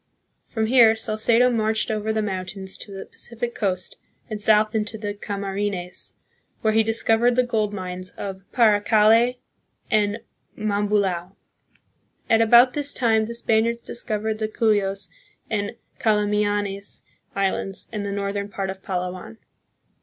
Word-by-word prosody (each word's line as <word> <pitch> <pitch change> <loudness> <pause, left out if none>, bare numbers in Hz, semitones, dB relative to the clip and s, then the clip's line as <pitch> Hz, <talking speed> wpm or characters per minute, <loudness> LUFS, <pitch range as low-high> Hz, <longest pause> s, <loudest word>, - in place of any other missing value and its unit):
1 - - -35
From 220 -1 +1
here 230 -1 +6
Salcedo 225 +3 +2
marched 220 -1 0
over 215 0 -1
the 220 0 0
mountains 190 -1 -4
to 205 - -8
the 195 0 -7
Pacific 235 0 -5
coast 185 -3 -2 0.3
and 210 -1 -4
south 215 0 +4
into 220 0 -1
the 205 -1 -4
Cam 200 -1 -5
arines, 195 -2 -3 0.5
where 220 -1 +2
he 220 - +5
discovered 225 +2 +2
the 255 - +4
gold 220 -4 0
mines 185 -2 -5
of 190 -1 -5
Paracale 220 +1 +4 0.6
and 210 -1 +2 0.4
Mambulao. 200 -3 0 1.0
At 225 0 +5
about 240 +3 +6
this 290 -1 -1
time 220 -3 +2
the 235 - -6
Spaniards 230 0 +1
discovered 220 -2 -3
the 215 - 0
Cuyos 200 -4 0 0.4
and 205 -2 -1 0.3
Calamianes 205 -2 0 0.3
islands 195 0 -2
and 210 -2 -3
the 200 - -3
northern 200 0 -2
part 195 -1 -3
of 190 0 -10
Palawan. 180 +3 -4
210 Hz, 140 wpm, -23 LUFS, 200-225 Hz, 1.0 s, here